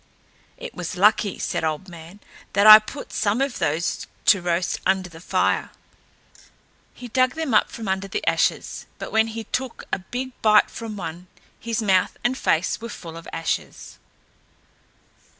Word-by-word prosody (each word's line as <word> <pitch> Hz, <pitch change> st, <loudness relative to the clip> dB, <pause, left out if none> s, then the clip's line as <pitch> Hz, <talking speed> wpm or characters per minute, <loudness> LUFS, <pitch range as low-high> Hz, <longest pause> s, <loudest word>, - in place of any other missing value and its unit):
"It -, -, -8 dB
was 180 Hz, 0 st, -5 dB
lucky," 205 Hz, 0 st, +3 dB
said -, -, -2 dB
Old 160 Hz, +4 st, -2 dB
Man, 170 Hz, +3 st, -12 dB, 0.3 s
"that 200 Hz, +2 st, +3 dB
I 215 Hz, 0 st, +12 dB
put 245 Hz, +6 st, -9 dB
some 210 Hz, +3 st, 0 dB
of 275 Hz, -2 st, -1 dB
those 160 Hz, +4 st, -1 dB, 0.2 s
to 195 Hz, -, +5 dB
roast 175 Hz, 0 st, -1 dB
under 190 Hz, -1 st, 0 dB
the 165 Hz, -, -12 dB
fire." -, -, 0 dB, 1.3 s
He 245 Hz, -, -9 dB
dug 255 Hz, +3 st, +1 dB
them 320 Hz, -6 st, -2 dB
up 215 Hz, -, +4 dB
from 225 Hz, -3 st, -7 dB
under 190 Hz, +1 st, -1 dB
the 195 Hz, -, -4 dB
ashes, -, -, 0 dB
but -, -, -7 dB
when 220 Hz, 0 st, +3 dB
he 225 Hz, 0 st, -6 dB
took 250 Hz, +3 st, -4 dB
a -, -, +1 dB
big 250 Hz, +7 st, -5 dB
bite 215 Hz, -1 st, +5 dB
from 225 Hz, -2 st, -7 dB
one, 175 Hz, 0 st, -7 dB, 0.3 s
his 230 Hz, -1 st, -2 dB
mouth 190 Hz, -3 st, +2 dB
and 245 Hz, +2 st, +1 dB
face 180 Hz, -5 st, 0 dB
were 230 Hz, -, -6 dB
full 165 Hz, -6 st, -9 dB
of 165 Hz, -, -10 dB
ashes. 165 Hz, 0 st, -4 dB
200 Hz, 165 wpm, -23 LUFS, 180-230 Hz, 1.3 s, I